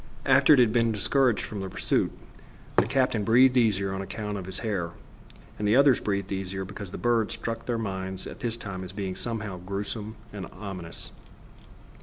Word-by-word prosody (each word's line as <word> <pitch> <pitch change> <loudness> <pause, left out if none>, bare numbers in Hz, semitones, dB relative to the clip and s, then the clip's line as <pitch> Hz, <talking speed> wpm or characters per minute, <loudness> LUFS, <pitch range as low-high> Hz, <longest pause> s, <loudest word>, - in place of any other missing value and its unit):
After - - +6
it - - 0
had 115 -3 +5
been 115 -1 +3
discouraged 120 +2 +2
from 105 - -5
the 95 -1 -4
pursuit - - 0 0.6
the - - +4
captain 130 -5 +2
breathed 125 +4 +6
easier 100 -5 +2
on 95 - -3
account 105 +1 -4
of 95 -2 -5
his 95 - -3
hair, 95 -6 -1 0.7
and 105 -1 +1
others 140 -2 +6
breathed 100 -2 -2
easier 95 0 -3
because 100 0 -7
the - - -6
bird 120 -3 +2
struck 115 0 -4
their 120 -2 0
minds 95 -3 -4
at - - -8
this 115 -1 -1
time 95 -4 -6
as 90 0 -8
being 95 -2 -3
somehow 105 -5 -3
grewsome 100 +4 -4 0.2
and 95 -4 -5
ominous. 90 -4 -6
105 Hz, 180 wpm, -27 LUFS, 95-115 Hz, 0.7 s, After